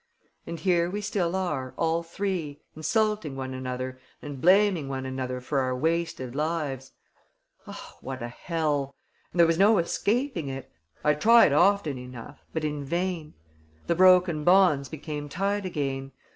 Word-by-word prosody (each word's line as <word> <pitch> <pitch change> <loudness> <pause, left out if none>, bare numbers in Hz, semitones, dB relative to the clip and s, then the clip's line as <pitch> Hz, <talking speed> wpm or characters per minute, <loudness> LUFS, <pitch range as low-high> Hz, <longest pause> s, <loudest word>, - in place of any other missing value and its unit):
And 170 0 -5
here 175 -3 +2
we 205 +3 -3
still 190 -4 -1
are, 150 -9 -2
all 165 0 +1
three, 170 -4 -4 0.2
insulting 210 -1 0
one 130 -1 -5
another 130 0 -5 0.2
and 145 -3 -8
blaming 185 -5 +4
one 130 -1 -4
another 130 -1 -3
for 135 +3 -1
our 130 -1 0
wasted 160 -4 -1
lives. 145 -3 -3 0.7
Oh, - - -10
what 130 -2 -6
a - - -3
hell! 145 0 -2 0.4
And 175 - -5
there 170 - +8
was 165 +1 +1
no 210 +2 +6
escaping 210 - 0
it. 135 0 -6 0.3
I 150 - +4
tried 225 +2 +6
often 175 -4 +3
enough... 125 -2 -10
but 160 - -3
in 150 -1 -2
vain. 170 +1 -3 0.5
The 170 - +1
broken 180 -3 +5
bonds 175 -6 +4
became 150 -1 -6
tied 200 +4 -1
again. 135 -5 -3
155 Hz, 150 wpm, -27 LUFS, 135-180 Hz, 0.7 s, there